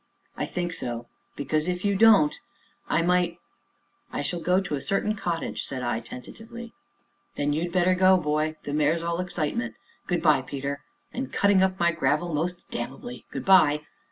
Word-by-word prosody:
"I - - -2
think 175 -1 -3
so 120 -4 -3 0.2
" - - -43
"Because, 155 +3 0
if 180 +1 -2
you 200 0 +2
don't 200 -8 +5 0.5
I 165 - +2
might 175 -1 +2 0.4
" - - -40
"I - - -2
shall 175 +4 -2
go 180 +2 +2
to 195 -5 -4
a 140 - -1
certain 200 +5 0
cottage," 175 -5 -3
said 130 -2 -4
I 120 -2 0
tentatively. 225 - -10 0.6
"Then 145 0 0
you'd 170 +3 -1
better 185 +1 +3
go, 185 +1 +5
boy 155 -1 0
the 145 - -4
mare's 155 +3 +2
all 170 0 -1
excitement 150 -10 -2 0.3
good 175 -2 0
by, 150 -5 +5
Peter 140 +1 -4 0.3
and 260 +2 -4
cutting 200 -2 +4
up 190 0 +1
my 170 0 +4
gravel 155 +4 0
most 175 +4 -2
damnably 135 - -6
good - - -6
by!" 150 -6 +5
170 Hz, 180 wpm, -26 LUFS, 145-185 Hz, 0.6 s, don't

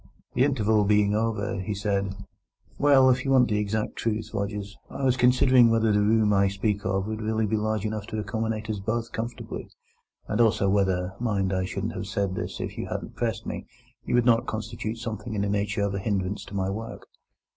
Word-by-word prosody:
That - - 0
interval 110 -6 +3
being 105 0 +3
over, 110 -1 -1
he 100 +2 -3
said: 100 -1 -1 0.6
"Well, 135 -2 +6
if 125 - 0
you 135 - -2
want 130 -3 +5
the 105 -1 +1
exact 105 +1 -2
truth, 110 -1 -2
Rogers, 100 0 -3
I 140 - -6
was 130 -2 +3
considering 125 -1 +5
whether 115 -1 +3
the 105 0 +3
room 105 0 +3
I 100 0 +4
speak 100 +1 -1
of 95 0 0
would 110 +1 -4
really 110 0 0
be 105 - 0
large 110 -1 -1
enough 110 -1 -3
to 110 - -4
accommodate 110 +1 -2
us 110 -2 -2
both 115 +3 -2
comfortably; 115 +1 -5 0.6
and 105 +2 +1
also 110 -3 +3
whether 95 -2 +1
(mind, 100 -5 0
I 95 0 0
shouldn't 95 +3 -3
have 95 - -5
said 100 -1 -1
this - - -4
if - - -5
you - - -3
hadn't - - -5
pressed - - -2
me) - - -5 0.4
you - - -1
would 120 -1 +3
not 115 -1 +4
constitute 110 +1 -4
something 110 -1 -5
in 100 - 0
the 100 - -1
nature 100 0 0
of 100 -1 0
a 100 - -2
hindrance 100 -1 -2
to 100 - -9
my 95 0 0
work." 115 +3 -6
105 Hz, 210 wpm, -26 LUFS, 100-115 Hz, 0.6 s, Well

